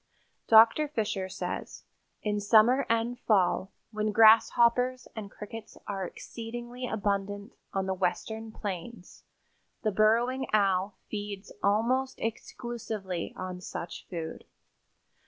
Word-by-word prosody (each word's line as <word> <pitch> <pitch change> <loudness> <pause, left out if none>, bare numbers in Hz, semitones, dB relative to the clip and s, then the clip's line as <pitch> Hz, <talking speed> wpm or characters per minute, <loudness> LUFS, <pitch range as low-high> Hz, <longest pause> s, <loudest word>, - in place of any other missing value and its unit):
Dr. 225 +7 +7
Fisher 210 -8 -2
says: - - -5 0.4
"In 210 -1 0
summer 225 +6 +5
and 230 +2 0
fall, 195 -3 +2 0.2
when 215 -1 -1
grasshoppers 235 +3 +5
and 215 -3 -6
crickets 215 +2 -9
are 195 -2 -3
exceedingly 240 +4 -7
abundant 205 0 -2 0.2
on 195 -1 -1
the 190 - 0
western 220 +4 -2
plains, 200 -1 -7 0.6
the 215 - +2
Burrowing 235 +6 +2
Owl 195 -1 +2
feeds 205 -1 -5
almost 240 +6 +1
exclusively 220 -5 -4
on 185 -1 -5
such 170 -1 -7
food. 165 -3 -5
215 Hz, 105 wpm, -29 LUFS, 195-235 Hz, 0.6 s, Dr